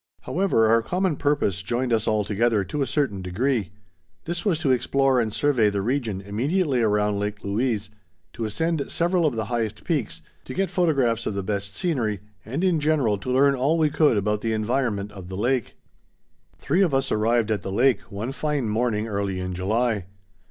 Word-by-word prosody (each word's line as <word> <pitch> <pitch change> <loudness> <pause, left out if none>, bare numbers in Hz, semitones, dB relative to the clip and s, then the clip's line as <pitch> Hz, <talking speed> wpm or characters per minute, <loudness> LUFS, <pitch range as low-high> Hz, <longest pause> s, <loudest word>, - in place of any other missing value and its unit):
However, 180 -12 +1
our 115 +1 +4
common 180 +5 0
purpose 145 -11 0
joined 120 +5 -1
us 110 -1 +1
all 105 -1 +2
together 105 +1 +1
to 100 +11 -4
a 135 - +1
certain 135 -10 -1
degree. 105 +3 -1 0.6
This 170 +1 -3
was 195 -7 +2
to 140 -5 +2
explore 130 +1 +2
and 110 -2 0
survey 125 -3 +2
the 100 -1 -2
region 115 -5 -1
immediately 130 - 0
around 105 -2 +1
Lake 105 0 -4
Louise, 105 0 -1 0.4
to 115 - -4
ascend 160 +7 -1
several 170 -1 +2
of 135 - -1
the 110 -1 -2
highest 115 -1 -3
peaks, 110 - -2 0.2
to 130 - -7
get 195 -1 0
photographs 135 -10 +1
of 105 - -2
the 100 - -2
best 100 0 -3
scenery, 120 - -1 0.2
and 135 - -3
in 180 -4 +3
general 145 -9 +1
to 130 - -6
learn 135 +2 +4
all 140 +5 +1
we 155 -2 +2
could 150 -6 +3
about 105 +1 0
the 115 0 -1
environment 110 -2 -1
of 95 -3 -10
the 95 - -5
lake. 125 +2 0 0.8
Three 175 +7 +1
of 170 -8 +3
us 135 0 0
arrived 110 +1 +2
at 105 - 0
the 95 - -5
lake 125 +5 +3
one 105 +6 -4
fine 145 -3 -1
morning 110 0 0
early 100 -3 -2
in 90 0 -4
July. 105 +2 0
115 Hz, 190 wpm, -24 LUFS, 105-140 Hz, 0.8 s, our